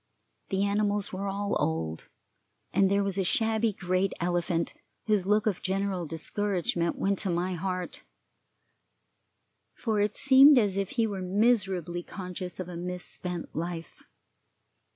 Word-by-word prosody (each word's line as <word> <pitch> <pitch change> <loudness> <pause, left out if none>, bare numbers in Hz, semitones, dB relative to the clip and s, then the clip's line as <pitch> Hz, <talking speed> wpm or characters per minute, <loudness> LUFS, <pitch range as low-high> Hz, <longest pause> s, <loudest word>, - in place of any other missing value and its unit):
The 195 0 +1
animals 205 0 0
were 195 +2 -3
all 200 +1 -1
old, 80 0 -2 0.6
and 195 -1 +4
there 200 +1 +2
was 195 -1 -1
a - - +2
shabby 220 +3 +2
great 185 0 0
elephant 175 -1 0 0.3
whose 210 -4 +1
look 210 +1 +3
of 205 -5 0
general 190 -2 -1
discouragement 170 +1 -1
went 195 0 0
to 195 - -2
my 175 +2 0
heart, 180 0 -3 1.7
for 220 -2 -1
it 205 0 0
seemed 270 +2 +8
as 205 -5 +3
if 195 -1 -1
he 230 -2 +2
were 200 -3 -3
miserably 190 -3 +1
conscious 180 0 -6
of 185 - -4
a 180 - -7
misspent 180 0 -3
life. 170 0 -5
190 Hz, 135 wpm, -28 LUFS, 180-205 Hz, 1.7 s, seemed